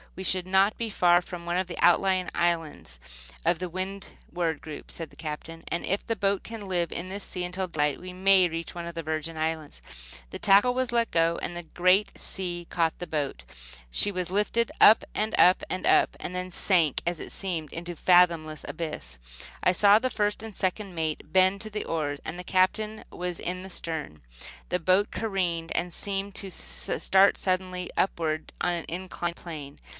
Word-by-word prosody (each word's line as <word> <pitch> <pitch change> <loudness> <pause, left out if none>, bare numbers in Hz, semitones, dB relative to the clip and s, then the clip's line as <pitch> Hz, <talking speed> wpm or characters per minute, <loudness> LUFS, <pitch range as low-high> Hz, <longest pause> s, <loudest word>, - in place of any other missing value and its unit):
"We 190 - -6
should 185 -1 +1
not 190 +2 +4
be 230 -1 -2
far 175 -3 +4
from 175 -1 -8
one 175 +1 -1
of 185 0 0
the 175 - -7
outlying 185 +1 +3
islands 165 - -1 0.5
of 170 - +2
the 180 -1 -3
Windward 180 -3 -4
group," 155 -2 -9
said 165 -2 -5
the - - -18
captain; 165 +1 -7
"and 170 - -2
if 195 - -1
the 230 - -1
boat 195 0 +1
can 220 -3 -8
live 175 -2 0
in 175 - -4
this 195 +1 -6
sea 180 -1 -4
until 185 +1 -2
daylight 150 -4 0
we 185 0 -7
may 185 0 +4
reach 165 +1 -5
one 170 -1 -5
of 170 0 -7
the 165 - -4
Virgin 155 +1 -3
Islands." 160 -1 -3 0.5
The - - -6
tackle 205 +5 +5
was 255 0 -1
let 235 -1 +1
go, 165 0 +2
and 175 - -4
a 175 - -5
great 185 +5 +2
sea 175 -3 -3
caught 165 -2 0
the 175 - -5
boat. 145 - -3 0.5
She 205 - +2
was 180 -2 -3
lifted 210 +4 +1
up, 220 - +8
and 215 +1 0
up, 180 +1 +6
and 185 - -3
up, - - +4
and 180 - -5
then 180 0 -4
sank, 170 -6 +2
it 175 -1 -3
seemed, 170 -6 -4
into 175 +1 -5
a - - -14
fathomless 170 -3 +3
abyss. 65 - -5 0.5
I - - +5
saw 200 +3 +6
the 255 +3 0
first 210 -2 -1
and 220 -3 -8
second 190 +1 -2
mate 160 -2 -3
bend 190 +1 +4
to 215 - -4
the 210 0 -4
oars. 145 -3 -2
The 180 +2 -5
Captain 210 +4 +1
was 180 -1 -4
in 180 +1 -3
the 190 - -9
stern. 160 - -4 0.5
The 180 - +1
boat 185 +4 +3
careened 180 -6 -1
and 175 0 -2
seemed 195 +1 -3
to 195 - -1
start 65 - +2
suddenly 185 -1 -1
upward 160 -4 -1
on 175 - +1
an 170 -1 -4
inclined 175 -1 -4
plane. 150 -4 -8
180 Hz, 190 wpm, -27 LUFS, 165-195 Hz, 0.5 s, up